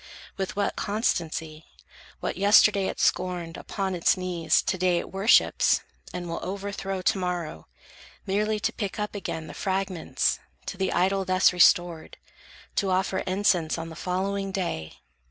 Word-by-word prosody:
With 190 Hz, -1 st, -3 dB
what 200 Hz, 0 st, 0 dB
constancy, 160 Hz, -7 st, -2 dB, 0.6 s
What -, -, -2 dB
yesterday 200 Hz, 0 st, +5 dB
it -, -, -4 dB
scorned, 175 Hz, -2 st, 0 dB
upon 195 Hz, -2 st, -3 dB
its 175 Hz, +1 st, +2 dB
knees 180 Hz, -3 st, +1 dB
To 190 Hz, -, 0 dB
day 180 Hz, -1 st, +2 dB
it -, -, -4 dB
worships, 195 Hz, +4 st, +4 dB, 0.3 s
and 180 Hz, -1 st, -5 dB
will 165 Hz, -, -3 dB
overthrow 195 Hz, -1 st, -4 dB
To 210 Hz, -, +2 dB
morrow, 175 Hz, -, -4 dB, 0.6 s
merely 210 Hz, +2 st, 0 dB
to -, -, 0 dB
pick 200 Hz, -4 st, -4 dB
up 210 Hz, 0 st, -3 dB
again 165 Hz, -5 st, -4 dB
The -, -, -9 dB
fragments, 190 Hz, -3 st, -1 dB, 0.3 s
to -, -, -5 dB
the 190 Hz, -, 0 dB
idol 195 Hz, +1 st, +2 dB
thus 185 Hz, 0 st, +3 dB
restored, 175 Hz, -2 st, +3 dB, 0.6 s
To 195 Hz, -, +1 dB
offer 190 Hz, +1 st, +1 dB
incense 185 Hz, -4 st, +1 dB
on 165 Hz, 0 st, -5 dB
the 160 Hz, -, -9 dB
following 195 Hz, +3 st, -2 dB
day! 170 Hz, -, -3 dB
185 Hz, 150 wpm, -26 LUFS, 175-195 Hz, 0.6 s, yesterday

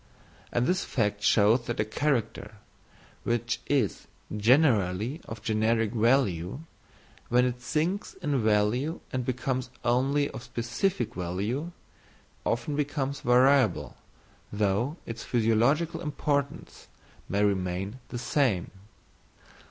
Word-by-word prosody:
And 120 Hz, 0 st, +1 dB
this 185 Hz, +5 st, +1 dB
fact 105 Hz, -5 st, -1 dB
shows 110 Hz, +3 st, +4 dB
that 120 Hz, -, -3 dB
a 110 Hz, -, +2 dB
character, 115 Hz, -2 st, -1 dB, 0.7 s
which 120 Hz, 0 st, -1 dB
is 135 Hz, -9 st, 0 dB, 0.3 s
generally 115 Hz, -, +2 dB
of 110 Hz, -1 st, -8 dB
generic 110 Hz, 0 st, +1 dB
value, 115 Hz, -, +1 dB, 0.7 s
when 125 Hz, +1 st, +4 dB
it 125 Hz, 0 st, -2 dB
sinks 165 Hz, +9 st, -1 dB
in 150 Hz, -8 st, -1 dB
value 110 Hz, +9 st, +1 dB
and 130 Hz, -1 st, -1 dB
becomes 130 Hz, 0 st, -2 dB, 0.2 s
only 135 Hz, +4 st, +2 dB
of -, -, -7 dB
specific 120 Hz, +13 st, -2 dB
value, 100 Hz, -, -3 dB, 0.8 s
often 120 Hz, +5 st, -1 dB
becomes 140 Hz, -1 st, -2 dB
variable, 125 Hz, -3 st, +3 dB, 0.6 s
though 105 Hz, -, 0 dB
its 115 Hz, -1 st, -6 dB
physiological 120 Hz, +8 st, +2 dB
importance 145 Hz, -1 st, -2 dB, 0.4 s
may 100 Hz, +1 st, +1 dB
remain 95 Hz, +3 st, -1 dB
the 120 Hz, -, -5 dB
same. 120 Hz, -, 0 dB
120 Hz, 105 wpm, -28 LUFS, 110-140 Hz, 0.8 s, shows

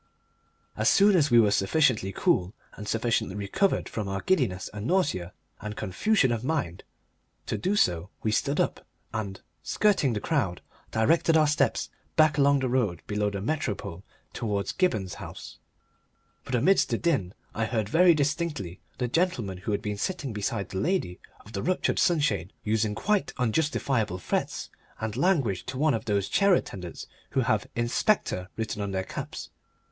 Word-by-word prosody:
As -, -, +3 dB
soon 200 Hz, 0 st, +5 dB
as 150 Hz, -4 st, +4 dB
we 120 Hz, -, +6 dB
were 105 Hz, -3 st, +5 dB
sufficiently 105 Hz, -1 st, +2 dB
cool 90 Hz, +1 st, +1 dB, 0.2 s
and 105 Hz, -, -9 dB
sufficiently 115 Hz, -3 st, 0 dB
recovered 105 Hz, -, 0 dB
from 105 Hz, -3 st, -4 dB
our 95 Hz, 0 st, -3 dB
giddiness 120 Hz, -, +1 dB
and 105 Hz, +2 st, -5 dB
nausea 140 Hz, -, +1 dB, 0.3 s
and 105 Hz, 0 st, -6 dB
confusion 130 Hz, -, +1 dB
of 115 Hz, -1 st, -2 dB
mind 125 Hz, -, -2 dB, 0.6 s
to -, -, -2 dB
do 195 Hz, +3 st, 0 dB
so 90 Hz, -, +1 dB
we 110 Hz, -, +1 dB
stood 140 Hz, +6 st, 0 dB
up -, -, 0 dB, 0.3 s
and, 100 Hz, -3 st, -4 dB, 0.2 s
skirting 195 Hz, -, +2 dB
the 105 Hz, -, -1 dB
crowd, 105 Hz, -, -1 dB, 0.3 s
directed 160 Hz, +8 st, +3 dB
our 155 Hz, -, +5 dB
steps 145 Hz, -4 st, +1 dB, 0.2 s
back 155 Hz, -2 st, +4 dB
along 140 Hz, 0 st, +4 dB
the 130 Hz, -, +1 dB
road 115 Hz, -10 st, 0 dB
below 105 Hz, 0 st, 0 dB
the 100 Hz, -1 st, -5 dB
Metropole 105 Hz, -, -3 dB, 0.3 s
towards 100 Hz, -3 st, -2 dB
Gibberne's 110 Hz, -, 0 dB
house. -, -, -9 dB, 0.9 s
But 130 Hz, -, -2 dB
amidst 185 Hz, +11 st, +3 dB
the -, -, +1 dB
din 130 Hz, -, 0 dB, 0.2 s
I 110 Hz, -, -1 dB
heard 110 Hz, -2 st, -1 dB
very 170 Hz, -, +5 dB
distinctly 145 Hz, -, -2 dB, 0.2 s
the 125 Hz, -, -1 dB
gentleman 120 Hz, -, 0 dB
who 100 Hz, -, -3 dB
had 100 Hz, 0 st, -1 dB
been 105 Hz, -2 st, -3 dB
sitting 140 Hz, -, -3 dB
beside 105 Hz, -1 st, -2 dB
the 95 Hz, -, -3 dB
lady 170 Hz, -, -1 dB, 0.3 s
of 110 Hz, -, -13 dB
the 100 Hz, -, -2 dB
ruptured 185 Hz, +1 st, 0 dB
sunshade 110 Hz, -, +1 dB
using 110 Hz, -1 st, 0 dB
quite 210 Hz, -, 0 dB
unjustifiable 125 Hz, -, 0 dB
threats 90 Hz, -, -3 dB, 0.3 s
and 110 Hz, -1 st, -3 dB
language 135 Hz, -, +1 dB
to 130 Hz, 0 st, -4 dB
one 150 Hz, +1 st, +3 dB
of 115 Hz, -, -2 dB
those 100 Hz, -3 st, 0 dB
chair 200 Hz, -2 st, +4 dB
attendants 90 Hz, -, -5 dB, 0.3 s
who -, -, +5 dB
have 110 Hz, -4 st, +1 dB
"Inspector" 120 Hz, -, 0 dB
written 110 Hz, -2 st, -3 dB
on 100 Hz, -, -2 dB
their 95 Hz, -1 st, -1 dB
caps. -, -, -7 dB
115 Hz, 165 wpm, -27 LUFS, 100-155 Hz, 0.9 s, we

